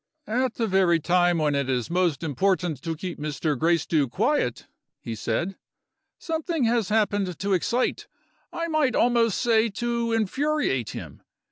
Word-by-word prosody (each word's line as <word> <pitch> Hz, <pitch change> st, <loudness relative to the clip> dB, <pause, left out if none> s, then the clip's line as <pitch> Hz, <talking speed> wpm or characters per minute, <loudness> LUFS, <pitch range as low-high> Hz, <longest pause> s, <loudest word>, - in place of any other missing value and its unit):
"At 250 Hz, +2 st, -1 dB
the 230 Hz, -, 0 dB
very 185 Hz, -4 st, +3 dB
time 175 Hz, +1 st, +2 dB
when 150 Hz, -2 st, +1 dB
it 140 Hz, -2 st, -1 dB
is 125 Hz, +2 st, -1 dB
most 175 Hz, -3 st, +1 dB
important 175 Hz, -1 st, 0 dB
to 165 Hz, +2 st, -3 dB
keep 175 Hz, +1 st, -6 dB
Mr. 150 Hz, 0 st, -2 dB
Gracedieu 160 Hz, -1 st, +1 dB
quiet," 215 Hz, -, 0 dB, 0.3 s
he 115 Hz, -, -6 dB
said, 145 Hz, -, -2 dB, 0.6 s
"something 325 Hz, -2 st, -2 dB
has 230 Hz, -3 st, +1 dB
happened 205 Hz, -5 st, +1 dB
to 200 Hz, +1 st, -1 dB
excite 235 Hz, +7 st, 0 dB, 0.4 s
I 335 Hz, 0 st, -3 dB
might 310 Hz, -6 st, +1 dB
almost 235 Hz, -3 st, +3 dB
say 230 Hz, -2 st, +3 dB
to 235 Hz, +2 st, -2 dB
infuriate 225 Hz, -, 0 dB
him. -, -, -8 dB
190 Hz, 145 wpm, -25 LUFS, 160-235 Hz, 0.6 s, very